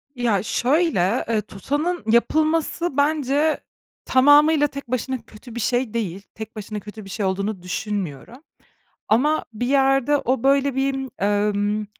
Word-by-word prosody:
Ya, 235 Hz, -6 st, +1 dB
şöyle, 245 Hz, -, +1 dB
eee, 220 Hz, -2 st, +1 dB
tutanın 290 Hz, -, -3 dB
yapılması 315 Hz, +5 st, +1 dB
bence 290 Hz, +1 st, +2 dB, 0.5 s
tamamıyla 295 Hz, +3 st, +5 dB
tek 280 Hz, -2 st, -9 dB
başına 255 Hz, +1 st, -2 dB
kötü 225 Hz, +2 st, -14 dB
bir -, -, -3 dB
şey 245 Hz, 0 st, 0 dB
değil. 200 Hz, -5 st, -3 dB
Tek 220 Hz, +1 st, -8 dB
başına 215 Hz, 0 st, -6 dB
kötü 210 Hz, +1 st, -10 dB
bir -, -, -11 dB
şey 200 Hz, +1 st, -3 dB
olduğunu 195 Hz, +1 st, -2 dB
düşünmüyorum. 195 Hz, -, -5 dB, 0.6 s
Ama 295 Hz, +8 st, +2 dB
bir 245 Hz, +3 st, -3 dB
yerde 270 Hz, +1 st, +3 dB
o 260 Hz, -3 st, -1 dB
böyle 275 Hz, 0 st, +3 dB
bir 270 Hz, 0 st, -1 dB
emm 205 Hz, +1 st, +1 dB
245 Hz, 135 wpm, -22 LUFS, 210-280 Hz, 0.6 s, tamamıyla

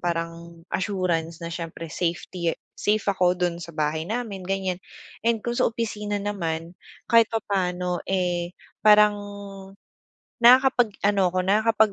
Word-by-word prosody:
parang 170 Hz, -1 st, -4 dB
assurance 180 Hz, -5 st, -1 dB
na 170 Hz, -, -4 dB
siyempre 165 Hz, -1 st, -6 dB
safety, 170 Hz, 0 st, -2 dB
eh, -, -, -33 dB
safe 210 Hz, 0 st, 0 dB
ako 180 Hz, -2 st, +2 dB
do'n 175 Hz, -1 st, -1 dB
sa 170 Hz, -1 st, -9 dB
bahay 155 Hz, +1 st, -1 dB
namin, 225 Hz, -4 st, -3 dB
ganyan. 190 Hz, -2 st, -1 dB, 0.5 s
And 230 Hz, -2 st, +2 dB
kung 240 Hz, 0 st, -2 dB
sa -, -, +4 dB
opisina 210 Hz, -3 st, -3 dB
naman 170 Hz, -4 st, -3 dB, 0.3 s
kahit 230 Hz, 0 st, +7 dB
papaano, 180 Hz, -4 st, -1 dB
eh, 180 Hz, -2 st, -1 dB, 0.2 s
parang 210 Hz, -1 st, +6 dB, 1.2 s
nakakapag 245 Hz, -2 st, +5 dB
ano 200 Hz, -2 st, +3 dB
'ko, 185 Hz, +1 st, -1 dB
nakakapag, 220 Hz, +2 st, +3 dB
185 Hz, 130 wpm, -25 LUFS, 170-210 Hz, 1.2 s, kahit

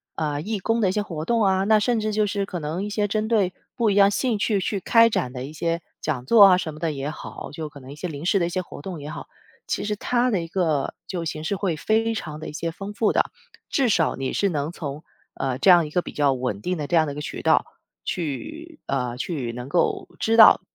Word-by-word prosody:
呃， 150 Hz, -2 st, -2 dB
义 210 Hz, +3 st, -3 dB
工 225 Hz, +4 st, 0 dB
的 195 Hz, -, +3 dB
一 -, -, +1 dB
些 210 Hz, -, 0 dB
活 165 Hz, -6 st, -5 dB
动 230 Hz, +1 st, +2 dB
啊， 190 Hz, 0 st, +3 dB
那 215 Hz, +1 st, +4 dB
甚 230 Hz, +1 st, +1 dB
至 215 Hz, 0 st, -1 dB
就 210 Hz, 0 st, +1 dB
是 200 Hz, 0 st, -1 dB
可 180 Hz, -3 st, -5 dB
能 160 Hz, +6 st, -3 dB
一 210 Hz, -, -3 dB
些 205 Hz, 0 st, 0 dB
针 215 Hz, +2 st, -1 dB
对 195 Hz, -5 st, +2 dB, 0.2 s
不 230 Hz, -3 st, +3 dB
一 200 Hz, -, +1 dB
样 200 Hz, 0 st, +6 dB
兴 235 Hz, -1 st, 0 dB
趣 205 Hz, -1 st, +1 dB
去 195 Hz, 0 st, -2 dB
开 230 Hz, +2 st, +5 dB
展 125 Hz, -, -1 dB
的 130 Hz, 0 st, -5 dB
一 150 Hz, -, -9 dB
些 165 Hz, +1 st, -1 dB, 0.2 s
讲 135 Hz, -5 st, -2 dB
座 210 Hz, -, +7 dB
啊， 185 Hz, -2 st, +7 dB
什 160 Hz, -4 st, -4 dB
么 155 Hz, -, -11 dB
的 165 Hz, -2 st, 0 dB
也 140 Hz, 0 st, -4 dB
好， -, -, -8 dB
就 155 Hz, -1 st, -5 dB
可 145 Hz, -1 st, -12 dB
能 130 Hz, -, -13 dB
一 -, -, -11 dB
些 175 Hz, +3 st, -5 dB
临 145 Hz, +1 st, -7 dB
时 195 Hz, -, +3 dB
的 170 Hz, -, +2 dB
一 -, -, -2 dB
些 185 Hz, +1 st, -1 dB
活 175 Hz, -, -10 dB
动 180 Hz, -3 st, -6 dB
也 145 Hz, +1 st, -7 dB
好。 -, -, -7 dB, 0.4 s
其 -, -, -1 dB
实 210 Hz, 0 st, -1 dB
它 245 Hz, +4 st, +1 dB
的 195 Hz, -7 st, +1 dB
一 165 Hz, -, -6 dB
个 165 Hz, -6 st, 0 dB
就 175 Hz, -3 st, -4 dB
形 155 Hz, -1 st, -4 dB
式 200 Hz, +5 st, -1 dB
会 185 Hz, -4 st, -1 dB
非 220 Hz, +7 st, +1 dB
常 155 Hz, -8 st, -5 dB
得 155 Hz, -, -7 dB
一 -, -, -9 dB
些 165 Hz, +2 st, -2 dB
丰 195 Hz, +5 st, -7 dB
富 215 Hz, 0 st, +2 dB
的， -, -, +1 dB, 0.4 s
至 270 Hz, -5 st, +1 dB
少 175 Hz, -6 st, +2 dB
你 135 Hz, -1 st, -3 dB
是 200 Hz, -, +1 dB
能 150 Hz, 0 st, -2 dB
从， 150 Hz, -2 st, -6 dB, 0.3 s
呃， 130 Hz, -2 st, -2 dB
这 185 Hz, -, +6 dB
样 170 Hz, -3 st, +6 dB
一 -, -, -9 dB
个 175 Hz, +3 st, 0 dB
比 -, -, -7 dB
较 145 Hz, -2 st, +2 dB
稳 125 Hz, -6 st, -3 dB
定 180 Hz, 0 st, -2 dB
的 150 Hz, -, -3 dB
这 175 Hz, -, 0 dB
样 160 Hz, -2 st, +4 dB
的 145 Hz, -, -4 dB
一 -, -, -10 dB
个 150 Hz, -, -5 dB
渠 -, -, -5 dB
道 -, -, +3 dB, 0.4 s
去 310 Hz, -, -5 dB
呃， 125 Hz, -3 st, -2 dB
去 130 Hz, -6 st, -3 dB
能 125 Hz, +2 st, -6 dB
够 170 Hz, -, 0 dB
知 225 Hz, +1 st, +2 dB
道， 220 Hz, -, +9 dB
175 Hz, 290 characters per minute, -24 LUFS, 150-210 Hz, 0.4 s, 道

